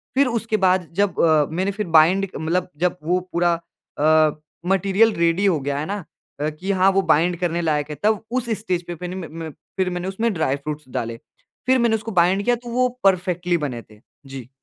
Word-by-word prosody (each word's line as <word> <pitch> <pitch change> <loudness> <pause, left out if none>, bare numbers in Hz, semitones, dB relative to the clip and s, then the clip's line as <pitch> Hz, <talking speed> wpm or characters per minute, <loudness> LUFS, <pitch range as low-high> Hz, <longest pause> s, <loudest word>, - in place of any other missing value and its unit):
फिर 275 0 +4
उसके 225 -2 -1
बाद 185 -2 +2
जब 205 -2 0
अ, 155 -3 +4
मैंने 190 +3 0
फिर 210 -1 -4
बाइंड 190 +5 +3
मतलब 170 +4 -1
जब 180 +2 0
वो 180 +3 +1
पूरा 175 0 +2 0.5
अ, 155 0 +3 0.3
मटीरियल 195 +3 +3
रेडी 170 +3 +2
हो 175 -6 +3
गया, 140 +1 -2
है 150 - -3
ना, 200 +1 -4 0.4
कि 155 +6 -2
हाँ, 190 0 +4
वो 195 0 +2
बाइंड 175 0 +2
करने 175 -1 -1
लायक 150 -2 0
है, 150 - -5
तब 215 0 +2
उस 250 -1 -1
स्टेज 180 -5 -2
पे - - -4
फिन 180 +2 -6
म - - -8 0.2
म - - -10 0.3
फिर 190 -1 +1
मैंने 180 +1 -4
उसमें 220 +4 -1
ड्राई 160 -6 0
फ्रूट्स 150 +1 -6
डाले। 115 -2 -4 0.5
फिर 260 0 +4
मैंने 235 -2 +3
उसको 220 +1 -5
बाइंड 185 +2 +3
किया 245 - +3
तो 240 0 -10
वो 250 +2 +2 0.2
परफ़ेक्टली 180 -2 +2
बने 135 -7 -4
थे। 105 -1 -20 0.3
जी। 130 -2 -9
180 Hz, 205 wpm, -22 LUFS, 155-200 Hz, 0.5 s, फिर